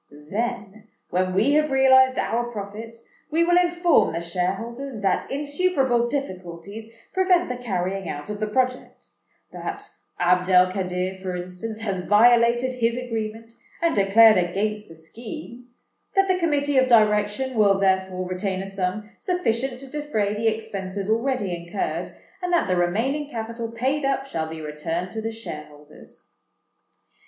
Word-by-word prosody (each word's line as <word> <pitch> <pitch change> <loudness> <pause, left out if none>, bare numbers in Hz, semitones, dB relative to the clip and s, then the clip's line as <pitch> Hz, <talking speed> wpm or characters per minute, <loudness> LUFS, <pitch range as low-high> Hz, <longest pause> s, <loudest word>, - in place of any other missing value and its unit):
Then, 220 -1 -3 0.2
when 185 0 0
we 220 +9 +3
have 305 +1 +3
realized 260 -1 +5
our 240 +1 0
profits, 225 +2 -8 0.2
we 325 +2 +2
will 350 +1 +4
inform 345 - +3
the 165 - -2
shareholders 210 +9 -3
that 195 -2 0
insuperable 280 -4 +1
difficulties 200 - -6 0.2
prevent 370 -2 +3
the 250 - -2
carrying 195 -5 -3
out 145 0 -6
of 210 - -5
the 215 - -1
project,—that 255 +3 -4 0.3
Abd 180 +1 +2
el 185 0 +5
Kadir, 185 -1 -2
for 190 -1 -5
instance, 180 +5 -6
has 195 -4 -2
violated 235 +4 +4
his 230 0 +1
agreement 225 -2 -5 0.3
and 335 -1 +2
declared 215 +2 +6
against 210 +4 -1
the 165 - -13
scheme,—that 240 - -5
the 370 -1 +2
Committee 290 -4 +2
of 260 - +3
Direction 215 +2 +3
will 205 -4 +4
therefore 190 -1 0
retain 185 +1 -2
a - - -7
sum 195 +2 -3
sufficient 265 - -1
to 275 - -8
defray 265 -8 -1
the 220 +2 -1
expenses 200 -2 -3
already 230 -4 0
incurred, 170 +3 -3 0.3
and 360 0 -2
that 345 - +2
the 185 - +1
remaining 230 +12 0
capital 230 -1 -5
paid 265 +6 -1
up 270 0 0
shall 160 -12 -3
be 160 0 -7
returned 165 +4 -4
to 220 - -4
the 225 +1 -3
shareholders." 150 -9 -11
220 Hz, 145 wpm, -24 LUFS, 190-260 Hz, 0.3 s, declared